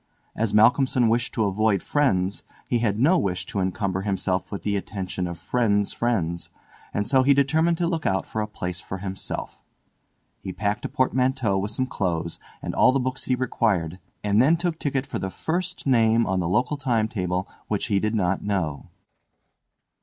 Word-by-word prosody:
As 110 -2 0
Malcolmson 125 +2 +4
wished 120 +2 +1
to 110 - +2
avoid 100 0 +1
friends 100 -10 +1 0.3
he 120 - +1
had 105 -3 0
no 165 +8 +4
wish 90 - -2
to 100 - -4
encumber 95 0 -1
himself 95 -2 -1
with 100 - -5
the 105 -1 0
attention 95 -2 -3
of 85 -1 -6
friends' 105 +2 +1
friends, 85 -8 -1 0.4
and 105 - -1
so 135 -1 +4
he 140 +1 +4
determined 160 +5 +2
to 175 - 0
look 165 -3 -1
out 95 0 0
for 110 - -3
a 105 - -2
place 90 -4 -5
for 95 - -6
himself. 95 0 -6 0.8
He 95 - -6
packed 105 +1 -2
a - - -2
portmanteau 130 -4 +1
with 100 +2 -2
some 130 +4 -1
clothes 85 -9 -2 0.2
and - - -3
all - - +5
the 135 - +1
books 130 0 -2
he 130 - +2
required, 100 -9 0 0.2
and 105 +1 +3
then 155 +6 +4
took 170 -1 -2
ticket 135 -2 -1
for - - -4
the 95 - -3
first 180 - -3
name 115 -3 +4
on 95 0 0
the 85 -2 -1
local 125 +9 +1
time 120 -6 +1
table 95 -3 -2 0.2
which 105 - -1
he 100 -2 +1
did 110 +2 -1
not 95 -2 0
know. 90 -6 -2
105 Hz, 185 wpm, -24 LUFS, 95-130 Hz, 0.8 s, all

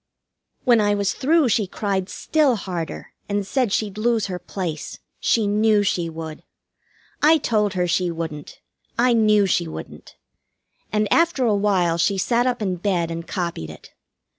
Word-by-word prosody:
When 240 -4 +4
I 205 0 +2
was 200 -1 0
through 300 -1 +2
she 210 -2 +1
cried 195 -1 -2
still 300 -6 +1
harder, 180 -5 -5 0.2
and 205 -1 -1
said 250 +1 0
she'd 210 -1 -1
lose 230 -1 +1
her 180 -3 -4
place. 175 -3 -5 0.2
She 225 -2 +2
knew 210 0 +3
she 175 -4 0
would. 160 -1 -7 0.8
I 315 +2 +6
told 210 -7 0
her 180 -1 +1
she 180 +1 +1
wouldn't. 160 -3 -6 0.4
I 245 +1 +4
knew 215 -3 +4
she 175 -2 +1
wouldn't. 160 - -9 0.8
And 210 0 +1
after 335 -6 +2
a 215 -3 +3
while 185 -5 +1
she 195 +3 +2
sat 240 +5 +1
up 245 -3 -1
in 185 -3 -1
bed 175 -3 -1
and 165 0 -6
copied 170 - -3
it. - - -13
205 Hz, 165 wpm, -22 LUFS, 175-225 Hz, 0.8 s, I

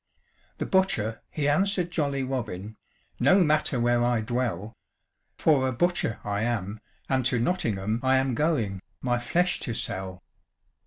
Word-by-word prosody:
The - - -2
butcher 115 - +1
he 145 -2 -2
answer'd 180 +3 +1
jolly 140 -5 -1
Robin, 110 -6 -4 0.4
"No 190 0 +5
matter 150 -4 +1
where 120 0 +2
I 120 -2 +2
dwell; 115 -3 -2 0.6
For 140 -5 +3
a - - 0
butcher 175 -3 0
I 105 0 -2
am, 110 -3 -2 0.3
and 130 -1 +1
to 125 - +1
Nottingham 110 - 0
I 130 0 +3
am 130 -1 +1
going, 115 - 0 0.2
my 120 -1 0
flesh 175 +9 +1
to 120 - -3
sell." 95 -3 -4
125 Hz, 145 wpm, -27 LUFS, 110-150 Hz, 0.6 s, No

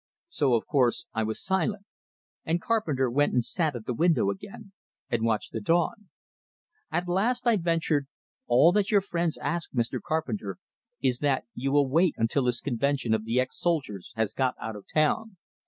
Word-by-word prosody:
So, 140 - +2
of 115 - -1
course, 140 +4 +1
I 110 - 0
was 110 0 -2
silent; 190 +2 0 0.6
and 165 +2 0
Carpenter 165 - 0
went 145 +5 +1
and 120 -2 +2
sat 160 -6 0
at 115 -2 -7
the 125 - -2
window 150 - +2
again, 195 - -10 0.4
and 120 -2 +1
watched 110 -2 0
the 110 - -4
dawn. 175 - 0 0.8
At 175 +1 -1
last 230 +8 +1
I 235 -2 +5
ventured: 165 -5 0 0.4
"All 130 +8 +6
that 205 +1 +1
your 205 -2 +4
friends 170 -4 -1
ask, 170 -1 -3
Mr. 120 -2 -1
Carpenter, 110 - -3 0.5
is 125 -2 +2
that 140 -3 +1
you 135 +2 -2
will 145 -1 +4
wait 165 +5 +3
until 115 +4 +1
this 120 -1 +1
convention 135 -2 0
of 110 0 0
the 115 +3 +1
ex 130 - -2
soldiers 140 - -1
has 110 -2 0
got 130 -1 0
out 110 0 -5
of 105 - -11
town. 185 +7 +1
145 Hz, 180 wpm, -27 LUFS, 120-175 Hz, 0.8 s, All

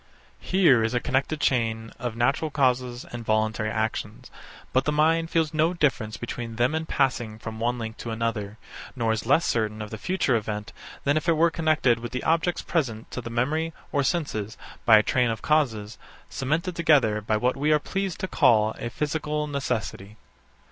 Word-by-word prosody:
Here 170 -12 +4
is 115 +2 -1
a - - +3
connected 135 +5 -1
chain 115 -4 0
of 120 -3 -3
natural 135 +7 +1
causes 125 -3 0
and 120 -1 -6
voluntary 110 0 0
actions; 110 -1 -3 0.4
but 130 - +2
the 150 - +1
mind 165 +2 +2
feels 160 -2 +1
no 160 +3 +2
difference 125 -9 0
between 120 -1 -5
them 120 +5 +2
in 160 0 -2
passing 120 -6 0
from 110 0 -7
one 120 +2 0
link 110 -1 -6
to 120 - -6
another: 110 -2 -3 0.4
Nor 115 -3 0
is 110 0 -2
less 160 +6 +4
certain 110 -2 0
of 105 -1 -6
the 110 - -6
future 180 -7 +1
event 105 -1 -3 0.3
than 145 +2 +2
if 155 +3 -1
it 165 - +3
were 170 +1 +4
connected 155 -8 +2
with 120 0 -7
the 125 - -3
objects 165 +2 +1
present 120 -10 -2
to 125 - -4
the 115 - -7
memory 150 +8 -1 0.2
or 145 - +2
senses, 130 - -2 0.3
by 110 -2 +8
a 105 - +4
train 125 -4 +2
of 110 -2 -4
causes, 115 -9 0 0.3
cemented 155 +6 -1
together 135 -11 +3
by 110 +1 0
what 125 +4 +1
we 145 +3 +1
are 150 - +6
pleased 195 +3 -3
to 190 - -1
call 110 -9 +3
a 120 - -3
physical 150 +3 -2
necessity. 110 -8 -4
125 Hz, 190 wpm, -25 LUFS, 110-155 Hz, 0.4 s, by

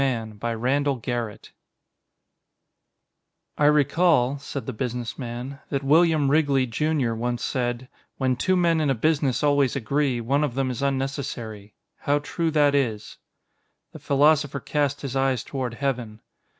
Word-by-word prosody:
_ - - +3
Illustrated 115 -5 -2
by 115 +1 -2
Martinez 120 -3 -2 2.1
"I 150 - +4
recall," 145 -2 +3
said 140 -3 -6
the - - -4
Businessman, 125 +2 -5
"that 140 -1 -2
William 155 -1 +4
Wrigley, 140 -4 +3
Junior, 135 0 0
once 120 +1 -2
said: 120 -1 -2 0.3
'When 130 -2 +1
two 185 +9 +1
men 170 -3 +2
in 150 - +1
a 135 - +2
business 145 +1 +1
always 145 -3 +3
agree, 135 0 0
one 135 +6 +1
of 135 -5 -2
them 135 -1 0
is 125 - -5
unnecessary.' 130 -7 -3 0.2
How 145 +1 +1
true 165 +3 -2
that 145 -2 +3
is." 115 -7 -1 0.8
_The - - -9
Philosopher 145 0 +3
cast 145 0 -1
his 135 -2 -5
eyes 135 -3 +1
toward 130 -4 -4
Heaven. 120 -5 -3
135 Hz, 140 wpm, -24 LUFS, 120-145 Hz, 2.1 s, I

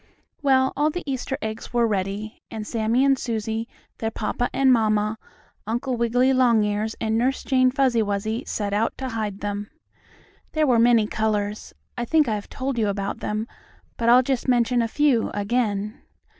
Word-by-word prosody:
Well, 265 -2 +3
all 295 +2 +2
the 355 +3 -4
Easter 270 -1 -3
eggs 220 +2 -5
were 240 -1 +3
ready, 205 +1 -3
and 220 -1 -6
Sammie 230 +4 +1
and 270 -1 +3
Susie, 225 -1 -3 0.3
their 225 - -1
papa 225 +2 -2
and 265 -1 +4
mamma, 215 -1 +1 0.5
Uncle 240 +3 -1
Wiggily 245 +3 +2
Longears 220 -4 +2
and 220 0 0
Nurse 260 +3 0
Jane 255 -1 +3
Fuzzy 255 -3 +2
Wuzzy, 215 +2 -2
set 205 -2 -2
out 215 +2 0
to 265 -1 -4
hide 215 -4 -4
them. 205 0 -4 0.8
There 310 -1 +2
were 245 -5 +3
many 230 -2 +5
colors. 210 -1 -2 0.2
I 240 - -1
think 305 +2 +3
I 220 - 0
have 205 -1 -5
told 260 -2 -3
you 215 - +2
about 200 0 -3
them, 215 +1 -2 0.5
but 235 0 0
I'll 250 +2 +7
just 265 0 -1
mention 245 -1 +3
a 230 - 0
few 270 -1 +2
again. 210 0 -1
230 Hz, 170 wpm, -24 LUFS, 215-255 Hz, 0.8 s, I'll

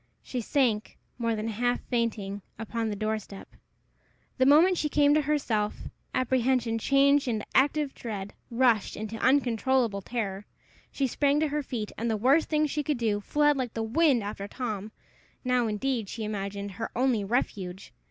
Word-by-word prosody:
She 250 - -4
sank, 230 -4 0 0.2
more 230 -1 0
than 215 +1 -3
half 245 +3 0
fainting, 215 -5 -2 0.2
upon 225 +1 -3
the 210 - -3
door 215 +1 -1
step. 195 -1 -11 0.9
The 260 - +5
moment 330 +6 +6
she 300 - 0
came 290 0 +4
to 305 - +4
herself, 255 -8 -1 0.3
apprehension 250 -2 +1
changed 275 +3 +3
into 220 -3 -1
active 285 +1 +2
dread, 205 -4 -6 0.2
rushed 235 -4 +2
into 220 +1 -5
uncontrollable 245 -4 +2
terror. 200 -3 -4 0.4
She 275 - 0
sprang 280 +3 +2
to 310 - +1
her 300 +1 -1
feet, 235 -6 -4
and, 230 +1 -1
the 220 - 0
worst 270 +9 +3
thing 305 -1 +2
she 295 0 -1
could 295 -2 -1
do, 220 -3 0
fled 295 +6 +2
like 250 -3 -3
the 225 - -1
wind 255 0 +3
after 200 -1 -5
Tom 215 -3 -4 0.5
now, 250 -2 +2
indeed, 220 0 -1
she 225 - -5
imagined, 200 -1 -4
her 225 +4 -5
only 245 -4 +2
refuge! 195 -4 -3
235 Hz, 165 wpm, -28 LUFS, 215-270 Hz, 0.9 s, moment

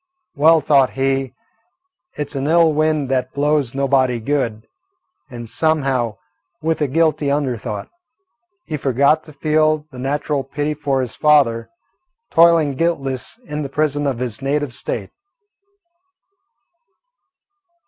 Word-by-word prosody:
Well, 160 +2 +5
thought 140 -2 +3
he, 135 -1 -1 0.8
it 150 - -4
's - - -11
an 135 +1 -2
ill 165 0 +4
wind 155 -2 +1
that 130 -1 -1
blows 145 -3 0
nobody 135 -3 +2
good, 115 -4 -2 0.6
and 120 -1 -8
somehow, 135 -6 0 0.4
with 160 0 -1
a 150 - +2
guilty 155 0 +1
under 140 -3 0
thought, 105 -2 -6 0.8
he 155 - -3
forgot 140 +3 +2
to 155 - -12
feel 155 +1 +1
the 125 - -10
natural 145 +1 -1
pity 145 +3 -3
for 140 -3 -1
his 125 - -5
father, 140 -7 +3 0.6
toiling 165 -3 +5
guiltless 135 - -2
in 150 -1 -4
the 140 - -4
prison 145 0 0
of 135 -4 -1
his 120 -1 -5
native 140 -1 -1
State. - - -5
140 Hz, 130 wpm, -19 LUFS, 130-155 Hz, 0.8 s, Well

